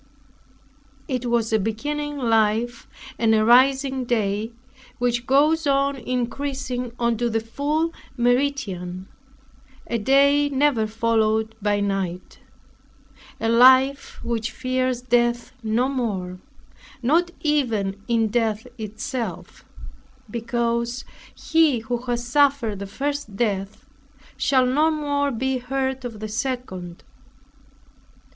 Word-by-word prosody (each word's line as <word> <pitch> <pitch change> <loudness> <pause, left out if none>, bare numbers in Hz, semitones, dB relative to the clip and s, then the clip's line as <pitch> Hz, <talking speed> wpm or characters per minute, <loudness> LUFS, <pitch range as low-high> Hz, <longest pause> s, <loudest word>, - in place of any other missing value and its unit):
It 250 -4 -2
was 235 -2 0
a 220 - +4
beginning 290 +8 -3
life 230 -1 +1 0.3
and 225 -1 +4
a 215 0 +3
rising 265 +2 +4
day, 220 -2 -1 0.5
which 240 0 -1
goes 300 +4 +3
on 275 0 +2
increasing 255 0 -3
unto 235 0 0
the 225 0 0
full 295 +8 -1 0.2
meridian; 230 -8 -1 0.8
a 235 - -2
day 280 +5 +4
never 270 -5 +2
followed 220 0 +1
by 205 0 +1
night; 195 -3 -3 1.0
a 225 - -1
life 260 +4 +5
which 235 -1 -2
fears 255 -1 -1
death 240 0 +1
no 225 +3 +1
more, 200 -9 -3 0.6
not 330 +8 +3
even 225 -10 0
in 225 -2 +2
death 220 -1 0
itself; 225 +4 -5 0.7
because 235 +1 -2 0.3
he 315 -7 +2
who 240 +2 -2
has 240 0 -1
suffered 265 -5 +2
the 200 - -5
first 280 0 -4
death, 200 -2 -2 0.5
shall 260 -2 +3
no 295 +5 +3
more 285 -2 0
be 260 +1 -1
hurt 265 +1 -2
of 230 -4 -7
the 215 - -3
second. 210 -7 -4
240 Hz, 110 wpm, -23 LUFS, 220-270 Hz, 1.0 s, life